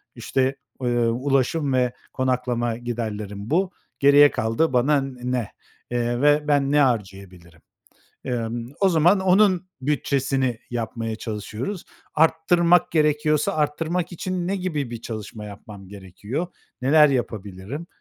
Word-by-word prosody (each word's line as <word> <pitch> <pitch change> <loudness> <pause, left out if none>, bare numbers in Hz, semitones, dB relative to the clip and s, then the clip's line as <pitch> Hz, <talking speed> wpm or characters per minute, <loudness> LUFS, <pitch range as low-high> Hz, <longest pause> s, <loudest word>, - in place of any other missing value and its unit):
İşte, 135 0 0 0.3
eee, 125 - -1 0.2
ulaşım 135 +4 0
ve 125 -1 +1 0.2
konaklama 125 -3 -1
giderlerim, 110 -3 -5
bu 180 +4 +1 0.3
geriye 140 +1 +7
kaldı 115 +7 0
bana, 140 +3 +3
n 135 -1 -6
ne, 125 -4 -1 0.4
eee, 120 +1 -1
ve, 150 +1 +3
"Ben 140 -1 +2
ne 150 - +4
harcayabilirim?" 95 - -2 0.6
Emm, 120 -1 -3
o 195 -1 +4
zaman 175 +4 +4
onun 190 -1 +3
bütçesini 135 -3 0
yapmaya 115 -1 -3
çalışıyoruz. 110 - -5 0.3
Arttırmak 170 +2 +3
gerekiyorsa 150 +3 +2
arttırmak 165 +4 -1
için 180 0 -3
ne 195 - 0
gibi 155 -9 -3
bir 115 -1 -7
çalışma 110 -1 -7
yapmam 100 -1 -11
gerekiyor? 100 - -6 0.3
Neler 150 +3 +6
yapabilirim? 110 - -4
130 Hz, 120 wpm, -23 LUFS, 115-155 Hz, 0.6 s, geriye